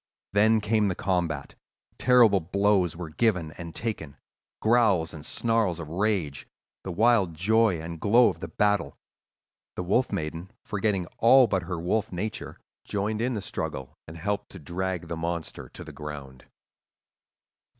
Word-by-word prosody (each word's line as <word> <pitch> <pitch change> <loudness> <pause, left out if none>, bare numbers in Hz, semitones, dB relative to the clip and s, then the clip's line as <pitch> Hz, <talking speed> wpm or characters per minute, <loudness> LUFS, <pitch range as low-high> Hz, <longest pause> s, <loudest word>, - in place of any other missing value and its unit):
Then 110 +2 +4
came 105 0 +2
the 90 - -1
combat: 85 -8 -1 0.5
terrible 120 -6 +5
blows 95 0 +1
were 85 -3 -6
given 90 -5 +1
and 85 +1 -9
taken, 105 - -4 0.4
growls 110 -8 +3
and 75 -2 -9
snarls 110 -2 +1
of 80 -2 -7
rage, 90 -6 -1 0.4
the 95 - -4
wild 105 -3 +3
joy 105 +1 +3
and 80 +1 -7
glow 115 +4 +5
of 85 -4 -6
the 85 - -5
battle. 105 -3 0 0.8
The - - -3
Wolf 110 +8 +1
Maiden, 80 +4 -4 0.2
forgetting 105 -3 0
all 130 +3 +7
but 100 -4 0
her 90 -1 -4
wolf 90 +5 -1
nature, 100 +5 -4 0.3
joined 105 +2 -2
in 125 +1 0
the 105 - -3
struggle, 65 -1 -4
and 80 +1 -9
helped 100 +5 -2
to 95 - -9
drag 90 +2 -3
the 85 - -4
monster 85 0 -4
to - - -8
the - - -10
ground. 70 -4 -8
95 Hz, 150 wpm, -27 LUFS, 80-110 Hz, 0.8 s, all